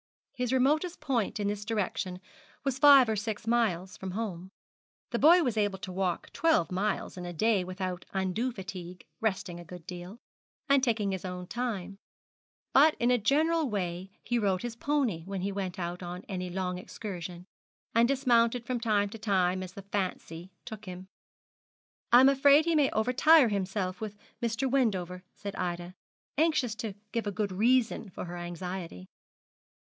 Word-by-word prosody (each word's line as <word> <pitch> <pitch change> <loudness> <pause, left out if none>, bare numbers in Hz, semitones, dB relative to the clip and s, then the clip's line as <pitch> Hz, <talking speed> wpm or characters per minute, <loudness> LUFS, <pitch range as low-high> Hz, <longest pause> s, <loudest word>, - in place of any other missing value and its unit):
His 250 -1 -2
remotest 300 +7 +2
point 235 -5 -1
in 205 - 0
this 205 0 -2
direction 190 -4 -2 0.4
was 270 -2 -1
five 280 -3 +8
or 220 - 0
six 210 +1 -4
miles 215 -6 0
from 190 - -6
home. 190 -5 -4 0.6
The 235 - 0
boy 340 +4 +7
was 245 -6 -1
able 205 -2 +1
to 185 0 -7
walk 185 -1 -2
twelve 320 - +2
miles 195 +1 -2
in 180 - -6
a - - -4
day 210 +2 +2
without 185 0 -4
undue 190 +6 -1
fatigue, 185 -4 -8
resting 190 -5 -2
a - - -8
good 175 0 -11
deal, 180 +4 -8 0.5
and 280 -2 +4
taking 220 -5 +1
his 190 -1 -4
own 180 -1 -5
time; 200 -3 -4 0.7
but 300 +3 +6
in 240 +1 +3
a 245 - +3
general 310 +6 +2
way 185 -2 -3
he 240 0 0
rode 195 -2 0
his 240 -1 -4
pony 260 - 0
when 195 -1 -4
he 200 +2 -1
went 195 -2 -4
on 175 0 -5
any 180 -1 -4
long 180 0 -3
excursion, 180 -3 -7 0.5
and 230 +1 +5
dismounted 245 -3 +2
from 255 -1 -2
time 210 -3 +2
to 225 - -9
time 185 -3 +1
as 185 -1 -7
the 200 - -9
fancy 185 -3 -4
took 215 -1 -8
him. 185 0 -8 1.0
'I'm 250 +2 +8
afraid 280 +3 +5
he 335 - +2
may 295 -4 +4
overtire 255 +5 +5
himself 190 0 -2
with 210 -1 -5 0.2
Mr. 235 +3 0
Wendover, 190 -9 0
said 200 -1 -6
Ida, 175 0 -3 0.5
anxious 305 -8 +2
to 220 -2 -5 0.2
give 230 -3 -2
a - - 0
good 205 0 -2
reason 225 +2 +2
for 180 - -7
her 175 0 -7
anxiety. 175 - -6
205 Hz, 165 wpm, -29 LUFS, 185-240 Hz, 1.0 s, five